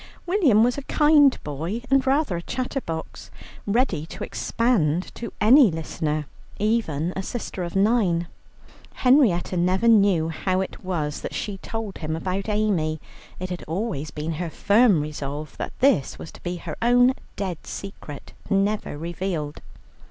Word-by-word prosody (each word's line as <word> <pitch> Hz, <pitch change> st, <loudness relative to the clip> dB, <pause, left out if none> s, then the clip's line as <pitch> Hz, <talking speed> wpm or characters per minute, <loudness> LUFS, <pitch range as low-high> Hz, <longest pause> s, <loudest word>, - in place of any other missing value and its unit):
William 330 Hz, -, +4 dB
was 245 Hz, +3 st, +1 dB
a 275 Hz, -, -12 dB
kind 295 Hz, -3 st, +5 dB
boy 165 Hz, -, -4 dB
and 270 Hz, -1 st, +3 dB
rather 275 Hz, -, +2 dB
a 170 Hz, -, -3 dB
chatterbox, 250 Hz, -, -5 dB, 0.4 s
ready 205 Hz, -, +1 dB
to -, -, -7 dB
expand 185 Hz, -9 st, 0 dB
to 235 Hz, -, -6 dB
any 245 Hz, +3 st, +7 dB
listener, 155 Hz, -2 st, -3 dB, 0.3 s
even 185 Hz, -7 st, 0 dB
a 190 Hz, -, -2 dB
sister 200 Hz, -2 st, -5 dB
of 170 Hz, +1 st, -6 dB
nine. 195 Hz, -5 st, +2 dB, 0.7 s
Henrietta 250 Hz, -10 st, +3 dB
never 185 Hz, +6 st, +2 dB
knew 200 Hz, -7 st, +4 dB
how 185 Hz, +3 st, -1 dB
it 190 Hz, -, -5 dB
was 155 Hz, -6 st, -2 dB
that -, -, -5 dB
she 200 Hz, -2 st, -4 dB
told 225 Hz, -2 st, -5 dB
him 155 Hz, -1 st, -3 dB
about 190 Hz, +5 st, -3 dB
Amy. 190 Hz, -8 st, 0 dB, 0.4 s
It 185 Hz, 0 st, -5 dB
had 180 Hz, -, -5 dB
always 165 Hz, -3 st, -3 dB
been 150 Hz, +2 st, -4 dB
her 175 Hz, -, -2 dB
firm 200 Hz, 0 st, +4 dB
resolve 150 Hz, 0 st, -5 dB
that -, -, -3 dB
this 260 Hz, -, +3 dB
was -, -, -9 dB
to -, -, -15 dB
be 175 Hz, 0 st, -3 dB
her 170 Hz, -3 st, -6 dB
own 245 Hz, +2 st, +5 dB, 0.2 s
dead 185 Hz, -5 st, -4 dB
secret, 175 Hz, -7 st, -8 dB, 0.2 s
never 200 Hz, -5 st, 0 dB
revealed. 165 Hz, -2 st, -4 dB
190 Hz, 150 wpm, -24 LUFS, 160-230 Hz, 0.7 s, any